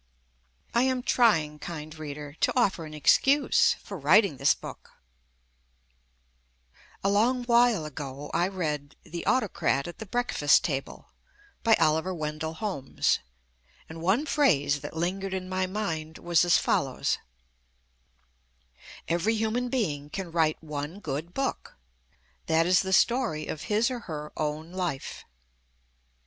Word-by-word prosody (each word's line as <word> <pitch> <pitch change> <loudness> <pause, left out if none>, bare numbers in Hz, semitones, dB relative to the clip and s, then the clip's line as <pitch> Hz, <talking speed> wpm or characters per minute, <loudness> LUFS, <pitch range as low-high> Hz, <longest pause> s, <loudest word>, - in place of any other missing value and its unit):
I 235 - +3
am 260 -1 +1
try 235 -6 +4
ing, 150 0 -11
Kind 155 -1 -7
Reader, 145 -1 -7
to - - +2
offer 190 -8 +1
an 155 - -10
excuse 270 - +4
for 200 -3 -7
writ 170 +10 +6
ing 155 -9 -5
this - - +4
book, - - -11 2.1
A - - +2
long 245 +5 +2
while 235 -7 +3
ago 145 -1 -7
I 170 +2 +2
read 150 -7 -3
"The 170 +1 -6
Autocrat 205 - +1
at 175 - -9
the 220 - -7
Breakfast 215 -10 +3
Table" 135 -4 -4 0.5
by 225 -2 +5
Oliver 160 +4 +1
Wendell 155 0 -4
Holmes, 185 -10 -1 0.7
and 160 0 -9
one 200 - +2
phrase 145 - +2
that 145 +2 -7
lingered 190 +3 -2
in 185 -1 -4
my 185 0 -1
mind 165 -6 -4
was 170 -1 +2
as 175 - +5
follows: 135 -2 0 1.9
"Every 175 +7 +1
human 225 +3 -1
being 150 - -2
can 180 +1 -5
write 160 -1 +1
one 150 +4 -5
good 155 0 -4
book 270 - -3 0.3
— 65 -3 -38
that 165 +1 +3
is 185 +1 +4
the 190 - -4
story 230 -7 +2
of 155 - -5
his 220 +4 +2
or 250 - -3
her 150 -7 -7
own 155 +2 -3
life." 180 -7 -4
170 Hz, 140 wpm, -27 LUFS, 150-215 Hz, 2.1 s, writ